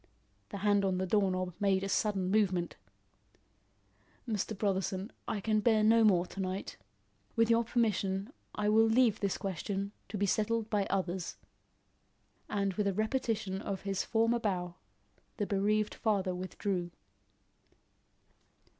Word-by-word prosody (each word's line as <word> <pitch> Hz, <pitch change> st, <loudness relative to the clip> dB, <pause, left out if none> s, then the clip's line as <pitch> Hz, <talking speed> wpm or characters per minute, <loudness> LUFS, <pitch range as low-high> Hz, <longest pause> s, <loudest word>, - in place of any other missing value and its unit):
The 200 Hz, -, -5 dB
hand 205 Hz, -1 st, +4 dB
on 190 Hz, -1 st, +1 dB
the 185 Hz, -, 0 dB
door 195 Hz, +1 st, +2 dB
knob 185 Hz, -1 st, -2 dB
made 195 Hz, -2 st, +2 dB
a -, -, -1 dB
sudden 195 Hz, -2 st, 0 dB
movement. 190 Hz, -5 st, +1 dB, 1.5 s
"Mr. 215 Hz, -1 st, -2 dB
Brotherson, 195 Hz, 0 st, -1 dB, 0.2 s
I 215 Hz, -, -1 dB
can 215 Hz, +1 st, +1 dB
bear 215 Hz, -1 st, +3 dB
no 225 Hz, +1 st, +5 dB
more 185 Hz, -5 st, +4 dB
to 195 Hz, -, -10 dB
night. 190 Hz, 0 st, -3 dB, 0.6 s
With 230 Hz, 0 st, +3 dB
your 230 Hz, 0 st, +4 dB
permission, 215 Hz, -1 st, 0 dB, 0.2 s
I 210 Hz, 0 st, -1 dB
will 220 Hz, +1 st, +5 dB
leave 225 Hz, -1 st, +3 dB
this 200 Hz, -2 st, -1 dB
question 195 Hz, +1 st, -3 dB, 0.2 s
to 210 Hz, -, -4 dB
be 200 Hz, -, +1 dB
settled 220 Hz, +2 st, 0 dB
by 205 Hz, -2 st, +1 dB
others." 185 Hz, -2 st, -2 dB, 1.1 s
And 200 Hz, -2 st, 0 dB
with 210 Hz, +1 st, 0 dB
a 195 Hz, -, +1 dB
repetition 215 Hz, -3 st, -1 dB
of 195 Hz, -2 st, -4 dB
his 195 Hz, -1 st, -1 dB
former 230 Hz, +1 st, +2 dB
bow, 180 Hz, -5 st, -2 dB, 0.6 s
the 205 Hz, -, 0 dB
bereaved 210 Hz, +2 st, +1 dB
father 200 Hz, -5 st, 0 dB
withdrew. 180 Hz, 0 st, -3 dB
200 Hz, 140 wpm, -32 LUFS, 190-215 Hz, 1.5 s, no